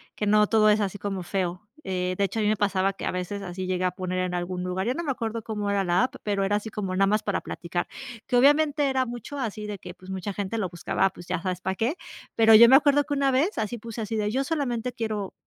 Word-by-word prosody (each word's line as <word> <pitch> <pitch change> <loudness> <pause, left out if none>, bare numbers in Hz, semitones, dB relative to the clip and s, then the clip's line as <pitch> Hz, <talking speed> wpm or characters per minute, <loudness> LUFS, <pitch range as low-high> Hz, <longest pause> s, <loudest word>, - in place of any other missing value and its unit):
que 210 - -2
no 210 0 +5
todo 215 -1 +4
es 210 0 +4
así 205 -1 -2
como 195 -1 -4
feo, 180 -1 -2 0.2
eh, 185 -1 -2
de 200 - +1
hecho, 200 +3 -1
a - - +1
mí - - +2
me 215 - +3
pasaba 195 -1 +1
que - - -7
a - - 0
veces 180 +3 -4
así 185 0 -5
llegué 185 0 -1
a 180 - +1
poner 185 0 -3
en 185 -1 -1
algún 180 +1 -3
lugar 185 +3 -2
yo 245 - +1
no 340 - -4
me 295 - -1
acuerdo 230 -3 -3
cómo 210 -2 -3
era 200 -1 +1
la 180 +6 +3
app, - - -8
pero 200 -2 0
era 205 +1 +1
así 210 +1 -6
como 195 -3 -3
nada 195 +1 +4
más 210 +2 +2
para 205 - -1
platicar 175 0 -4 0.4
que 250 - +2
obviamente 290 +2 +4
era 260 -1 +1
mucho 240 +4 -7
así 215 -5 -4
de 205 -1 -5
que 180 - -9
pues 185 +1 -15
mucha 190 +1 -4
gente 205 +3 -3
lo 195 -5 -1
buscaba 175 +2 0
pues 175 0 -13
ya 180 -1 -2
sabes 180 -1 -2
para 190 0 -2
qué, 235 - 0 0.4
pero 225 -1 +7
yo 235 +2 +9
me 265 - +9
acuerdo 290 0 +3
que 290 - -4
una 275 -1 +2
vez 295 +11 +1
así 220 +2 -2
puse 230 +1 -8
así 220 +1 -3
de: 210 -1 0
"Yo 265 +4 0
solamente 250 -6 -2
quiero 215 -4 -3
210 Hz, 275 wpm, -26 LUFS, 185-235 Hz, 0.4 s, yo